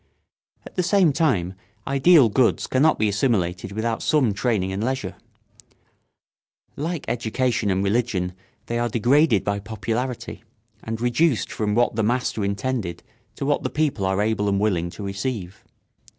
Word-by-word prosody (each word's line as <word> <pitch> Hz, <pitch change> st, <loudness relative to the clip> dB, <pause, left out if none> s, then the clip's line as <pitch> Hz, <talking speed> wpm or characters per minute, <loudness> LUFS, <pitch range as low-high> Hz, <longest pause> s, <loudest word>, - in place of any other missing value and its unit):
At -, -, -13 dB
the -, -, +3 dB
same 180 Hz, -3 st, +3 dB
time 100 Hz, -, +1 dB, 0.3 s
ideal 140 Hz, 0 st, +5 dB
goods 115 Hz, +2 st, +2 dB
cannot 145 Hz, +5 st, +3 dB
be 110 Hz, -, +1 dB
assimilated 100 Hz, -4 st, 0 dB
without 110 Hz, +2 st, -2 dB
some 135 Hz, -9 st, +2 dB
training 100 Hz, -3 st, 0 dB
and 95 Hz, +3 st, -3 dB
leisure. 130 Hz, +2 st, -2 dB, 1.6 s
Like 160 Hz, +2 st, -3 dB
education 120 Hz, -1 st, -1 dB
and 95 Hz, 0 st, +1 dB
religion 100 Hz, -4 st, 0 dB, 0.3 s
they 120 Hz, 0 st, -2 dB
are 120 Hz, 0 st, 0 dB
degraded 120 Hz, -, +3 dB
by 100 Hz, 0 st, -1 dB
popularity, 115 Hz, +4 st, -4 dB, 0.4 s
and 110 Hz, 0 st, -4 dB
reduced 125 Hz, +3 st, +1 dB
from 105 Hz, -1 st, -1 dB
what 120 Hz, -1 st, +2 dB
the -, -, +2 dB
master 120 Hz, -1 st, 0 dB
intended 100 Hz, -1 st, -2 dB, 0.3 s
to -, -, -4 dB
what 145 Hz, +1 st, +1 dB
the -, -, -2 dB
people 150 Hz, -9 st, -1 dB
are 95 Hz, +2 st, +1 dB
able 105 Hz, -1 st, 0 dB
and 100 Hz, 0 st, +1 dB
willing 90 Hz, -5 st, 0 dB
to 90 Hz, +4 st, -9 dB
receive. 100 Hz, -1 st, -4 dB
115 Hz, 150 wpm, -23 LUFS, 100-130 Hz, 1.6 s, ideal